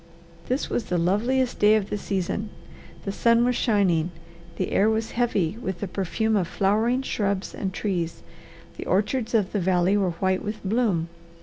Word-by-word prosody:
This 255 +3 -1
was 230 - -2
the 180 - -1
loveliest 235 +9 +1
day 210 +1 +6
of 205 -2 -1
the 210 - 0
season. 200 +2 -2 0.6
The 195 - -1
sun 235 +3 +3
was 250 0 +1
shining, 185 -9 +2 0.5
the 185 - -2
air 210 +2 +4
was 220 0 -1
heavy 220 -5 0
with 190 -5 -4
the 200 - -3
perfume 210 +4 -1
of 185 -5 +1
flowering 220 +8 +1
shrubs 200 -5 -1
and 190 - -3
trees, 180 -4 -3 0.5
the - - -6
orchards 220 +5 0
of 205 -4 +2
the 205 - 0
valley 185 +1 +2
were 190 -4 +1
white 190 +3 0
with 210 0 -3
bloom. 195 -6 +1
205 Hz, 175 wpm, -25 LUFS, 185-225 Hz, 0.6 s, day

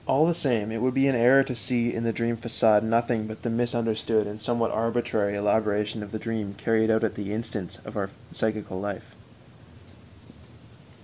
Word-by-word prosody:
All 145 +4 +4
the 170 - +3
same, 115 -9 0
it 115 0 -3
would 130 0 +1
be 135 +1 +4
an 135 - +3
error 125 +3 +6
to 130 - -4
see 120 0 0
in 115 - -3
the 115 - +1
dream 115 +1 -1
façade 110 -2 +3
nothing 115 0 0
but 110 0 -9
the 120 - -1
misunderstood 115 -2 0
and 105 +1 -7
somewhat 115 +1 0
arbitrary 110 -3 0
elaboration 105 +1 0
of 105 -1 -8
the 110 - -3
dream 110 -3 -4
carried 110 0 +1
out 110 0 +3
at 110 - +1
the 100 -1 -5
instance 105 -4 -4
of - - -9
our - - -2 0.2
psychical 110 -4 -2
life. 100 -1 -6
115 Hz, 185 wpm, -26 LUFS, 105-120 Hz, 0.2 s, error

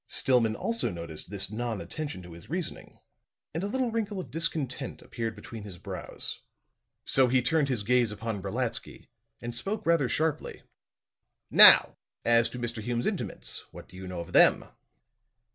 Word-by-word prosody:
Stillman 120 -4 +2
also 230 - -1
noticed 85 -3 -7
this 100 0 0
non 115 -1 -3
attention 95 - -6
to 85 -1 -11
his 85 0 -13
reasoning, 175 +1 -5 0.6
and 165 - -2
a - - -1
little 250 +2 -1
wrinkle 215 -3 -2
of 135 -10 -8
discontent 150 -4 -2
appeared 115 -2 -5
between 110 +1 -9
his 100 -3 -9
brows. - - -5 0.7
So 130 -1 +4
he 130 +1 +3
turned 150 +1 +1
his 120 -6 -1
gaze 120 0 +2
upon 110 -1 -5
Brolatsky 115 +4 -4 0.3
and 120 0 -6
spoke 200 - -4
rather 165 -6 +2
sharply. 155 +2 -2 0.9
"Now, - - +9 0.3
as 115 0 +4
to - - -8
Mr. 120 -2 -4
Hume's 120 +2 -2
intimates? - - -3
What - - -12
do - - -16
you 95 0 -8
know 90 -2 -5
of 85 +1 -10
them?" - - +6
120 Hz, 160 wpm, -28 LUFS, 105-150 Hz, 0.9 s, Now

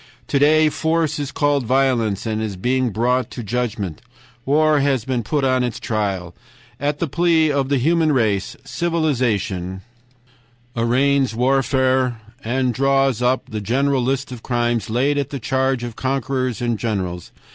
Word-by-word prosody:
'To 140 - 0
day 155 +2 +5
force 160 0 0
is 140 -2 -3
called 145 -1 +1
violence, 120 -5 +1
and 110 -1 -2
is 105 -3 -3
being 125 +6 0
brought 125 +4 0
to 120 - -7
judgment; 105 -6 -3 0.5
war 155 +1 +3
has 135 -4 +1
been 130 -2 -1
put 140 +6 -1
on 130 -1 +2
its 120 -2 -3
trial. 100 -6 -2 0.5
At 145 +1 -1
the 170 - -1
plea 160 0 +2
of 140 -2 0
the 140 - +2
human 160 +4 +2
race, 110 -7 0
civilization 115 - -1 0.9
arraigns 130 +2 +2
warfare, 130 -1 +1 0.2
and 125 +1 0
draws 135 -2 +2
up 125 +1 +1
the 110 -1 -3
great 125 +7 0
list 135 0 0
of 125 -3 -8
crimes 120 -3 -1
laid 135 +6 +1
at 140 - -2
the 140 - -5
charge 130 +1 0
of 120 -2 -6
conquerors 130 -1 -2
and 120 -3 -1
generals. 95 -6 -3
130 Hz, 155 wpm, -20 LUFS, 115-140 Hz, 0.9 s, day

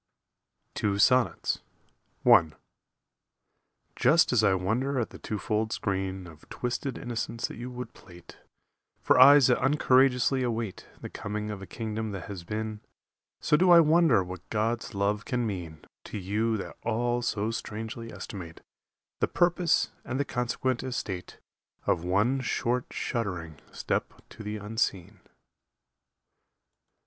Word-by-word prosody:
Two 100 -1 0
Sonnets 125 +4 +2 0.6
I 80 -2 +6 1.4
Just 160 -4 +4
as 115 -3 +4
I 100 -2 +4
wonder 120 +9 0
at 120 - -2
the - - -11
twofold 110 +1 -2
screen 95 -1 -2
Of 80 -3 -15
twisted 125 +2 -3
innocence 115 -1 -3
that - - -10
you 120 +2 -6
would 125 0 -7
plait 85 -1 -15 0.6
For - - +4
eyes 140 +1 +9
that 125 - +3
uncourageously 130 -2 +3
await 115 -5 -3
The - - -6
coming 105 +1 -4
of 100 -2 -6
a 95 - -8
kingdom 110 -1 -4
that 95 -3 -5
has 95 -4 -7
been, 110 +3 -4 0.6
So - - +3
do 180 +4 +4
I 170 -1 +9
wonder 160 - +5
what 90 0 -9
God's 115 +1 -1
love 100 +2 0
can 125 -1 -1
mean 85 -7 -6 0.2
To - - -6
you 105 +4 0
that 100 - -7
all 120 +2 0
so 110 -2 -1
strangely 115 +1 -6
estimate 85 -5 -8 0.6
The - - +2
purpose 175 0 +2
and 130 +2 -3
the 140 - +1
consequent 125 0 -1
estate 105 -8 -5 0.5
Of 85 - +1
one 105 +9 +2
short 120 0 -1
shuddering 90 -10 -4
step - - -2
to - - -12
the 105 0 -4
Unseen. 105 -2 -2
110 Hz, 135 wpm, -28 LUFS, 100-125 Hz, 1.4 s, eyes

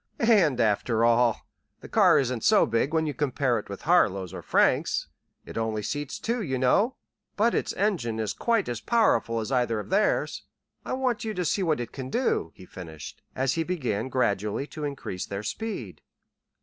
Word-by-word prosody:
"And, 165 - +4
after 115 +1 +2
all, 120 -1 +3 0.4
the - - -10
car - - +5
isn't 125 -4 0
so - - +5
big 115 +5 0
when 160 -1 +1
you 150 - -2
compare 130 -3 0
it 105 - -11
with 100 - -7
Harlow's 100 - +2
or - - -6
Frank's. - - +2 0.4
It - - -5
only 110 -1 -2
seats 145 +5 -3
two, 235 +1 -2
you 135 -9 -2
know, 200 - +2 0.4
but 230 +3 +2
its - - 0
engine 170 - -1
is 110 -2 -1
quite 230 -3 0
as 120 -2 -4
powerful 220 - +2
as 110 - -5
either 120 -4 +1
of 105 - -8
theirs. 205 +2 +1 0.4
I - - -4
want 255 -3 -1
you 220 -1 -3
to 180 - -1
see 195 - 0
what 160 -6 +1
it 120 - -5
can 130 -2 -6
do," 185 - 0
he 95 - -13
finished, 80 -5 -10
as 130 0 +1
he 165 - -1
began 130 - -2
gradually 105 -1 0
to 150 - -4
increase 135 -10 -5
their 100 +1 -5
speed. 125 - -5
130 Hz, 190 wpm, -26 LUFS, 110-180 Hz, 0.4 s, car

